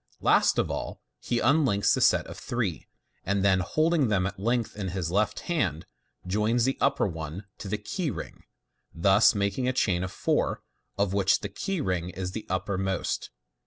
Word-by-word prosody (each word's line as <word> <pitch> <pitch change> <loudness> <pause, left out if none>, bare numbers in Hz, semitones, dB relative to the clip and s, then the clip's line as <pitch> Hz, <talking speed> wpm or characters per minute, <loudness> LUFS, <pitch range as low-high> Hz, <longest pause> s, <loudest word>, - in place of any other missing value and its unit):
Last - - +3
of - - +1
all, - - -4 0.2
he 120 - -2
unlinks 125 -6 +3
the - - 0
set - - +4
of - - -9
three, 110 - -3 0.4
and 100 +1 0
then, 95 -2 +4
holding 155 - +2
them 100 -4 +1
at 100 0 -4
length 115 +2 0
in 100 -2 -4
his 90 -2 -3
left 105 +3 0
hand, 100 - -1 0.4
joins 105 +5 +1
the 135 - +1
upper - - +2
one 80 +1 -5
to - - -7
the 105 +2 -1
key 125 - -3
ring, - - -7 0.5
thus 100 +6 +5
making 100 +6 0
a 130 - +1
chain 90 -8 +1
of 95 - -4
four, - - 0 0.3
of 100 -1 +1
which 100 0 +3
the 105 - -4
key 185 - -3
ring 90 -6 -1
is 90 0 -5
the 110 +3 -6
uppermost. 95 0 -2
100 Hz, 180 wpm, -27 LUFS, 95-120 Hz, 0.5 s, thus